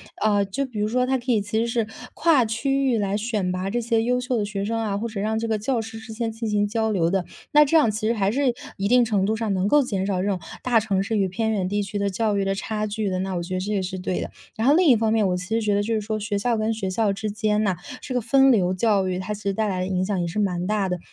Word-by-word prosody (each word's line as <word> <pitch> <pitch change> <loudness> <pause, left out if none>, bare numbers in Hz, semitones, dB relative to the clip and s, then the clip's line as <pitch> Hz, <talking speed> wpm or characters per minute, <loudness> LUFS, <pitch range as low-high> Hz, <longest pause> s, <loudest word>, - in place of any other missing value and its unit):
啊， 205 -2 +2
就 200 +8 -2
比 235 -5 -7
如 210 - +1
说 250 +3 +1
它 265 0 +1
可 250 +1 -2
以 220 - +3
其 205 +2 -3
实 230 - +1
是 230 -2 0 0.3
跨 315 -7 +4
区 270 +5 0
域 235 - +2
来 200 -1 0
选 210 -4 -1
拔 185 +1 -2
这 240 +4 -1
些 230 -1 +1
优 250 +1 +1
秀 250 -1 -1
的 210 - 0
学 200 -1 -3
生 225 +2 -1
啊， 210 -3 -1
或 225 +3 -2
者 215 -3 -6
让 220 +1 0
这 230 - -2
个 220 -1 0
教 230 +2 -1
师 225 0 -8
之 220 0 -10
间 225 0 -2
进 225 0 -4
行 205 0 +1
交 220 0 0
流 170 -5 +2
的， 190 -1 0 0.3
那 300 -1 +7
这 320 +3 +4
样 295 -8 +4
其 215 +1 -2
实 230 - +2
还 200 -3 +1
是 270 -1 +1 0.2
一 200 0 0
定 245 +1 +5
程 205 -4 +1
度 215 +2 +1
上 220 -2 -1
能 190 +1 0
够 295 +5 +5
减 195 -6 -2
少 190 -2 0
这 195 - -1
种 195 -3 0 0.2
大 240 -3 +4
城 200 -3 0
市 220 +2 -1
与 195 - +2
偏 220 +5 -1
远 195 -4 0
地 205 +1 0
区 200 +1 -5
的 200 0 0
教 210 +2 0
育 200 - +1
的 195 - +1
差 215 +1 -3
距 210 -1 -2
的， 185 -1 -1
那 190 0 -2
我 175 - -2
觉 185 - -6
得 185 - 0
这 195 +3 -3
也 195 - +1
是 185 0 -4
对 180 0 -2
的。 - - -4 0.3
然 225 +4 0
后 285 - +7
另 355 -1 +4
一 255 - +7
方 220 0 +1
面 220 -3 +3
我 180 -1 0
其 180 - -5
实 225 +2 0
觉 210 -1 +1
得， 205 - +2
就 225 +2 -1
是 215 - 0
说 215 +1 -3
学 205 -1 -2
校 235 +3 0
跟 220 +1 0
学 200 -4 -3
校 205 +2 +1
之 215 +2 -4
间 210 0 0
呐， 195 -3 +1 0.3
这 260 - -5
个 250 - +1
分 270 +4 +5
流 185 -6 +2
教 195 -1 +2
育， 180 0 -2
它 185 +3 -3
其 210 - -8
实 200 - 0
带 215 +2 0
来 185 -2 -2
的 185 - -2
影 185 -1 0
响 200 -2 -1
也 175 - -1
是 170 +5 -3
蛮 180 -4 0
大 210 -2 +1
的。 180 -1 -2
215 Hz, 345 characters per minute, -24 LUFS, 195-230 Hz, 0.3 s, 那